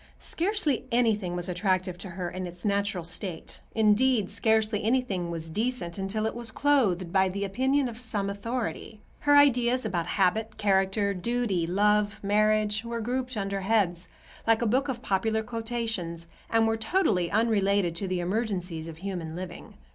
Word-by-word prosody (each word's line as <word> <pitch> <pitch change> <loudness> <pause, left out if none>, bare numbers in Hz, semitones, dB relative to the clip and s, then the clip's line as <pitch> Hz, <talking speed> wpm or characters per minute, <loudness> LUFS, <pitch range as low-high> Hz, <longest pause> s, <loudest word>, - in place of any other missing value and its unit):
Scarcely 330 - -1
anything 215 -7 +1
was 175 0 -3
attractive 185 0 0
to 190 - -7
her 180 0 -4
in 185 0 -4
its 175 +2 -11
natural 200 -3 0
state—indeed, 210 +6 0
scarcely 220 -1 +1
anything 220 -7 0
was 165 -1 -3
decent 200 -1 -2
until 205 +3 -1
it 220 - -1
was 235 -1 -5
clothed 210 -10 +1
by 190 -1 +4
the 200 +2 -3
opinion 265 +7 +1
of 235 0 -8
some 215 -4 -2
authority. 220 +1 -4 0.2
Her 290 -1 +5
ideas 255 -3 +4
about 175 -6 -1
habit, 215 +4 +1
character, 200 0 +2
duty, 195 -3 -1
love, 210 +3 +2
marriage, 215 +1 +2
were 235 0 -4
grouped 250 +1 -2
under 195 -1 -2
heads, 190 -4 +1 0.4
like 225 +1 +4
a - - +1
book 260 +6 +2
of 250 -2 -4
popular 220 +1 0
quotations, 225 -8 -3 0.2
and 225 0 +3
were 225 0 +1
totally 220 - +1
unrelated 200 -4 +2
to 195 - -2
the 185 -1 -1
emergencies 180 -4 -2
of 160 -1 -8
human 175 -3 -5
living. 180 -1 -8
210 Hz, 155 wpm, -27 LUFS, 185-230 Hz, 0.4 s, Her